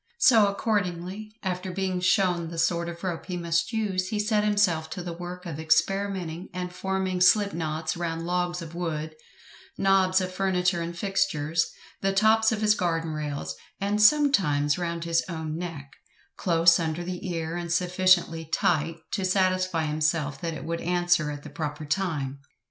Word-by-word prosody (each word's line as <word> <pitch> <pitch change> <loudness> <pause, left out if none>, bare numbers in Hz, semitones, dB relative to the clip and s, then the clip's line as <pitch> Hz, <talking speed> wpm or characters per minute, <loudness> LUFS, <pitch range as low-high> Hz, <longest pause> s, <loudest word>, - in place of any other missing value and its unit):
So, 225 -7 +6
accordingly, 200 0 -2
after 185 0 -3
being 185 0 -1
shown 180 -2 +2
the 165 0 -7
sort 170 +1 +1
of 170 +1 -9
rope 180 -2 -4
he 180 -2 -3
must 170 +2 0
use, 200 -5 -1
he 210 - -2
set 210 0 +1
himself 195 -7 +2
to 180 +1 -5
the 175 -1 -5
work 180 +1 -8
of 160 -3 -5
experimenting 185 +1 0
and 180 -1 -4
forming 190 -1 -2
slip 200 +2 +5
knots 160 -1 -2
round 165 -1 -3
logs 175 0 -1
of 165 0 -10
wood, 160 -3 -3 0.6
knobs 190 -1 +3
of 185 -1 -3
furniture 180 -2 +1
and 170 +1 -5
fixtures, 165 -5 0 0.3
the 195 0 +1
tops 220 +3 +4
of 220 -1 -2
his 210 -1 +5
garden 165 -4 -1
rails, 145 - -4 0.2
and 205 +2 0
sometimes 190 - +4
round 170 -1 -3
his 170 0 +1
own 160 -2 -4
neck, 160 -5 -6 0.4
close 165 -1 +4
under 165 +1 -2
the 180 +1 -5
ear, 165 -1 -3
and 175 -1 -4
sufficiently 180 -2 +2
tight 160 +2 +1 0.2
to 195 - -1
satisfy 185 -2 +1
himself 150 -2 -1
that 165 -1 -3
it - - -7
would 170 +1 -3
answer 175 -3 +2
at 145 -1 -6
the - - -9
proper 150 0 -4
time. 150 -5 -2
175 Hz, 165 wpm, -26 LUFS, 165-190 Hz, 0.6 s, So